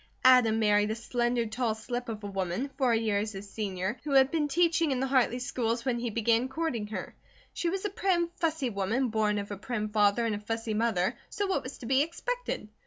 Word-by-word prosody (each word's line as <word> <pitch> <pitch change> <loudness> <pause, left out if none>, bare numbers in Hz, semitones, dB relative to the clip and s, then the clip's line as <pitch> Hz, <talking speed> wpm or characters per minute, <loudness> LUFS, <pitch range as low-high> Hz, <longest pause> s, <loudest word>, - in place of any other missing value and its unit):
Adam 250 -4 +6
married 210 -1 +3
a 220 - -1
slender 240 0 0
tall 225 0 -1
slip 245 +2 -5
of 215 -2 -5
a - - -4
woman, 195 +7 -2
four 260 -3 +2
years 215 -1 0
his 195 +1 -8
senior, 195 0 -3
who 290 -1 -2
had 270 0 +6
been 310 -3 +1
teaching 330 +1 +2
in 265 -2 0
the 265 - +1
Hartley 255 -2 +2
schools 235 -1 -2
when 245 -2 0
he 240 0 -2
began 230 +3 +1
courting 265 -8 -2
her. 215 - -6 0.4
She 345 - -1
was 385 +3 -3
a - - +1
prim, 360 -4 +1
fussy 315 -6 0
woman, 220 +6 0
born 215 -1 +1
of 205 0 -4
a 205 - -4
prim 215 0 -3
father 210 +2 +3
and 225 - 0
a 205 - -3
fussy 225 +1 -3
mother, 220 -1 +1
so 410 - -2
what 385 - 0
was 255 +2 -8
to - - -10
be 265 +3 +3
expected? 485 - -3
235 Hz, 220 wpm, -29 LUFS, 215-270 Hz, 0.4 s, Adam